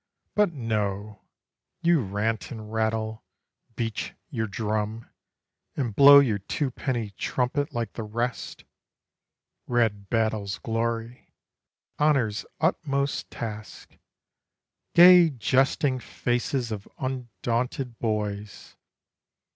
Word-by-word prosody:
But 210 -4 +3
no; 105 - -3 0.6
you 170 -3 +4
rant 105 +2 -2
and 110 -2 -8
rattle, 110 0 -1 0.5
beat 115 -3 -3 0.2
your 110 -1 -2
drum, 110 +2 -3 0.7
And 120 -7 -2
blow 140 +3 +10
your 120 -8 +4
two 130 +7 -2
penny 120 -4 -3
trumpet 130 +7 -1
like 115 -3 -3
the - - -5
rest: 115 +3 -4 1.0
"Red 110 -5 0
battle's 110 -3 0
glory," 115 +1 -3 0.7
"honour's 130 -8 +2
utmost 140 -4 0
task," 110 -2 -8 1.0
"Gay 175 -1 +9
jesting 135 +1 +1
faces 120 0 -2
of 100 -2 -5
undaunted 125 -1 -3
boys 105 -2 -3
115 Hz, 90 wpm, -26 LUFS, 110-130 Hz, 1.0 s, blow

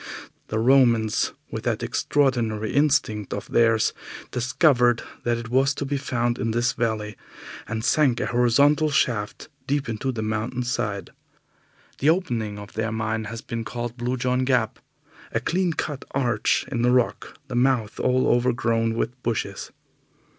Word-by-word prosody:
The 110 - -2
Romans, 115 -3 +3 0.2
with - - -4
that - - -1
extraordinary 115 -7 0
instinct 140 -8 +1
of - - -6
theirs, 115 -2 +3 0.4
discovered 125 -1 +3 0.2
that 120 0 +1
it 115 -1 -7
was 135 +2 +2
to 140 - -3
be 140 +1 -2
found 120 -3 -1
in 115 - -1
this 120 +3 +1
valley, 110 -3 -2 0.5
and 115 0 -3
sank 130 -2 +3
a - - 0
horizontal 140 +6 +3
shaft 120 -7 0 0.2
deep 140 0 0
into 115 +4 -2
the 110 -3 -4
mountain 110 +3 -2
side. 105 -6 -3 0.9
The 145 - +3
opening 120 - 0
of 100 0 -10
their 110 0 -2
mine 110 0 -2
has 115 +1 -6
been 115 -1 -4
called 120 +1 -5
Blue 125 +1 -2
John 125 +1 0
Gap, 125 -4 +1 0.5
a - - +2
clean 175 +8 0
cut 145 -2 -4
arch 120 -5 +1
in 120 -3 -1
the 120 - +3
rock, 125 -1 0
the - - -7
mouth 120 -4 +1
all 130 0 +2
overgrown 115 -2 +1
with 120 +2 -3
bushes. 115 -3 -3
120 Hz, 155 wpm, -24 LUFS, 110-130 Hz, 0.9 s, Romans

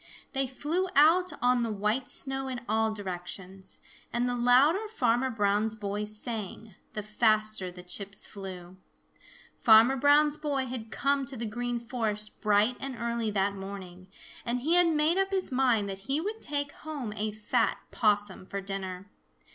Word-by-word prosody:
They 270 -1 +1
flew 310 +8 -1
out 335 +6 +5
on 250 0 +4
the 230 - -1
white 210 +5 -1
snow 270 0 0
in 255 -2 -4
all 220 +1 +1
directions. 190 -1 -5 0.3
And 240 +1 0
the 245 - 0
louder 270 - +4
Farmer 255 - +1
Brown's 215 -1 +1
boy 205 0 -3
sang, 215 -1 -5 0.2
the 210 - -4
faster 215 -2 +2
the 180 0 -11
chips 195 +2 -4
flew. 185 -2 -8 0.8
Farmer 230 +4 +7
Brown's 290 +2 +4
boy 280 -4 -1
had 240 -3 -6
come 275 +6 +1
to 265 - -3
the 230 - -3
Green 240 +2 -3
Forest 220 -3 -2
bright 210 +3 +3
and 270 -1 -5
early 235 -1 -1
that 200 -1 +1
morning, 190 -2 -8 0.4
and 245 +1 -2
he 315 +6 +1
had 355 0 +6
made 320 +3 +2
up 390 0 +1
his 380 -5 0
mind 250 -5 +2
that 195 -1 -5
he 280 +3 +2
would 425 +6 -4
take 285 -1 -1
home 285 -9 -6
a 215 0 -2
fat 215 +3 0
Possum 205 -4 +1
for 200 - -4
dinner. 195 0 -5
230 Hz, 165 wpm, -29 LUFS, 205-270 Hz, 0.8 s, Farmer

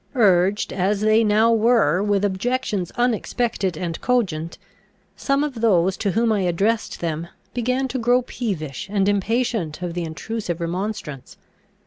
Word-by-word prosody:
Urged, 195 -3 +3
as 195 +2 0
they 215 +1 +4
now 220 +2 +4
were, 220 -7 +3
with 205 -1 +1
objections 205 -2 -1
unexpected 235 -6 0
and 170 -2 -4
cogent, 180 -10 -1 0.6
some 275 0 0
of 270 -7 -4
those 190 -4 +3
to 205 - -1
whom 230 +1 +2
I 210 - +2
addressed 195 +6 0
them 165 0 -3 0.3
began 250 +2 0
to 260 - -2
grow 245 +2 +3
peevish 185 - -4
and 200 -1 +1
impatient 205 -5 0
of 175 -1 -3
the 175 0 -3
intrusive 175 +2 -4
remonstrance. 170 - -5
205 Hz, 140 wpm, -22 LUFS, 175-230 Hz, 0.6 s, they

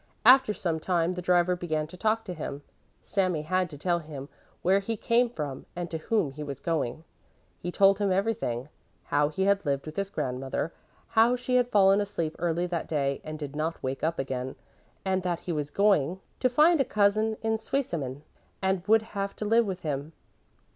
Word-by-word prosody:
After 260 -1 +8
some 170 -5 -2
time 175 +1 +1
the 180 - -5
driver 180 0 +3
began 155 -3 -2
to 160 - -11
talk 220 +4 0
to 185 - -4
him. 145 -3 -6 0.4
Sami 185 -6 0
had 185 +2 0
to 145 - -9
tell 175 +3 +1
him 145 -3 -8 0.3
where 190 +2 +4
he 225 +3 -3
came 235 +3 +2
from 150 - -5
and 175 -1 -4
to 160 - -3
whom 175 -4 0
he 150 +3 -9
was 140 -3 -5
going. 155 -2 -2 0.6
He 175 - -4
told 195 +1 +5
him 200 -2 +1
everything, 185 - -1 0.3
how 145 0 +2
he 175 +5 -1
had 200 0 +3
lived 140 -3 -1
with 155 0 -8
his 195 0 -1
grandmother, 135 +2 -3 0.4
how 230 +2 +4
she 250 +1 -1
had 245 -1 +3
fallen 200 -2 +5
asleep 170 -6 -3
early 170 +1 0
that 175 -2 -3
day, 140 -3 -1
and 155 0 -6
did 145 -1 -6
not 160 +2 -2
wake 130 +1 -3
up 165 +1 0
again; 130 -1 -3 0.5
and 190 0 +1
that 175 -2 -2
he 180 - -4
was 150 -3 -2
going 190 -2 +2 0.2
to 255 - +3
find 305 +5 +5
a - - +4
cousin 215 0 +2
in 220 0 +1
Zweisimmen 150 - -3 0.4
and 190 -1 +1
would 220 +1 +5
have 200 -3 -4
to 215 - -4
live 225 +1 +4
with 190 -2 -4
him. 150 0 -3
180 Hz, 195 wpm, -28 LUFS, 150-205 Hz, 0.6 s, After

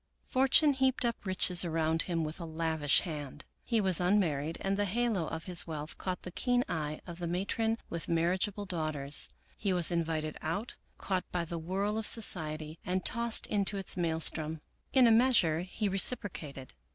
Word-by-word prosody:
Fortune 270 +3 +3
heaped 265 -1 +1
up 235 -1 -2
riches 185 -1 +3
around 160 -1 -1
him 170 -2 -2
with 155 +3 -6
a 170 - -6
lavish 160 -3 +1
hand. 150 -4 -7 0.2
He 230 -2 0
was 190 -4 +4
unmarried 165 -5 0
and 195 0 -1
the 205 +1 0
halo 210 -4 -1
of 160 0 -6
his 180 -2 +1
wealth 155 -1 -6
caught 185 -1 -4
the 180 - -8
keen 245 +5 0
eye 155 -1 -4
of 170 -1 -9
the 175 - -4
matron 210 +6 -1
with 170 -1 -6
marriage 170 +4 +1
able 205 0 -7
daughters. 155 -6 +1 0.3
He 200 - -1
was 175 -1 +4
invited 160 -2 -2
out, 200 +9 -4 0.2
caught 185 -2 -3
by 175 -1 -2
the 170 0 -6
whirl 195 +6 -2
of 220 - +3
society, 155 -7 +3
and 185 +1 -2
tossed 235 -1 +2
into 200 0 -1
its 195 - +1
maelstrom. 160 -2 +1 0.3
In 260 -2 +5
a 230 - +5
measure 225 -9 +3
he 185 +4 -3
reciprocated. 185 - 0
175 Hz, 175 wpm, -30 LUFS, 160-205 Hz, 0.3 s, In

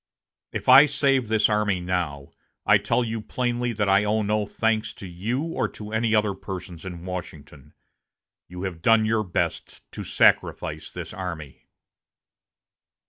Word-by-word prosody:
If - - -5
I 135 +3 +9
save 135 -3 +1
this 110 0 +3
army 105 -3 +1
now, 85 -6 -3 0.3
I - - +5
tell 125 - +1
you 115 -1 -3
plainly 120 +1 -2
that 105 -2 -1
I 100 +1 +4
owe 105 +1 +1
no 105 0 0
thanks 110 -1 -1
to - - -10
you 105 - -3
or 165 0 -1
to 105 0 -10
any 110 0 +1
other 105 -2 +2
persons 90 -3 -8
in 85 -1 -8
Washington. 80 -6 -8 0.7
You 90 +1 -8
have 90 -4 -5
done 115 +3 +4
your 110 0 +1
best 90 - -3
to - - -7
sacrifice - - +1
this - - -8
army." 85 -7 -7
105 Hz, 150 wpm, -24 LUFS, 90-115 Hz, 0.7 s, I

